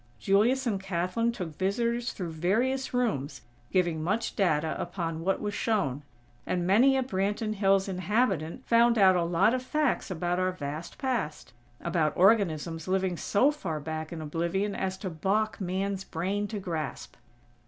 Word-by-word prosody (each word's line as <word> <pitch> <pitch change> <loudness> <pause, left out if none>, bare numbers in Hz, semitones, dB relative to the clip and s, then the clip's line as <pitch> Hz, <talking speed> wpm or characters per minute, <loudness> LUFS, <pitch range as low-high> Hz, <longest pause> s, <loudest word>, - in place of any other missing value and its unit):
Julius 235 +7 +2
and 205 -5 -1
Kathlyn 190 +5 0
took 185 -8 -5
visitors 235 +5 0
through 175 -4 -5
various 230 +12 0
rooms, 215 - -1 0.3
giving 175 -4 +1
much 210 +8 -1
data 160 -6 +1
upon 170 -2 -3
what 195 +2 +1
was 205 -1 -3
shown; 150 - 0 0.5
and 180 -1 0
many 245 +9 +5
a 265 - +1
Branton 210 0 -1
Hills 195 -1 +2
inhabitant 190 - -1
found 235 0 +4
out 190 -3 +6
a 175 - +2
lot 175 +6 +3
of 255 - 0
facts 295 -1 0
about 175 0 -1
our 185 0 +1
vast 150 -1 -6
past; 225 - -3 0.3
about 155 -4 0
organisms 170 -5 +2
living 190 -1 +1
so 230 - +2
far 175 - -4
back 155 +1 -5
in 160 -2 -5
oblivion 170 +6 -1
as 190 -1 -2
to 190 -1 -4
balk 200 +7 0
Man's 190 +1 -2
brain 195 +5 -2
to 215 - -5
grasp. 165 -6 -5
190 Hz, 155 wpm, -28 LUFS, 170-220 Hz, 0.5 s, out